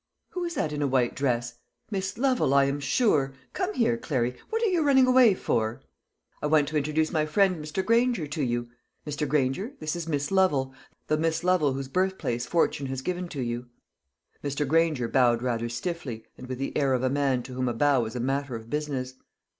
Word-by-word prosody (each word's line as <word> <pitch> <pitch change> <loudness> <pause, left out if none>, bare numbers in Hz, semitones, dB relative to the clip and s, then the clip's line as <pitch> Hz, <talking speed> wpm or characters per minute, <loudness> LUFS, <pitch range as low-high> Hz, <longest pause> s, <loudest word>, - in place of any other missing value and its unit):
"Who 360 - -4
is 340 -1 -4
that 155 - -1
in 145 - -3
a 145 - +2
white 130 -2 +1
dress? 120 -3 -1 0.3
Miss 195 0 -3
Lovel, 250 - +2
I 140 - +6
am 140 +1 -1
sure. 140 - +2 0.2
Come 385 +2 -2
here, 235 0 +2
Clary 125 - -1
what 450 +1 -1
are - - +4
you 360 -4 +2
running 270 -3 +5
away 250 -5 +6
for? 110 -8 -1 0.6
I 150 - 0
want 150 -1 +3
to 155 - -6
introduce 155 +2 0
my 155 -3 +1
friend 185 0 +2
Mr. 155 +5 -3
Granger 235 -6 +2
to 150 +1 -4
you. 120 -2 -1 0.3
Mr. 150 0 -2
Granger, 150 - 0
this 155 +2 -3
is 170 -1 -5
Miss 145 -1 -1
Lovel, 150 -9 +2 0.3
the 155 - +1
Miss 160 +1 0
Lovel 175 -6 +3
whose 135 0 -4
birthplace 145 -8 -1
fortune 155 -5 +1
has 130 0 -4
given 180 +2 -2
to 145 -5 -5
you." 120 0 -3 0.8
Mr. 145 0 -1
Granger 155 -5 +2
bowed 120 -1 +3
rather 120 -2 -1
stiffly, 125 -4 -4
and 125 - -10
with 130 0 -4
the 135 - -4
air 140 -3 +2
of 130 0 0
a 130 - +2
man 135 -3 +1
to 130 - -9
whom 130 0 -1
a - - -1
bow 140 +1 +3
was 110 0 -4
a - - -2
matter 135 +1 -1
of 115 0 -9
business. 140 -4 -2
145 Hz, 210 wpm, -27 LUFS, 130-180 Hz, 0.8 s, I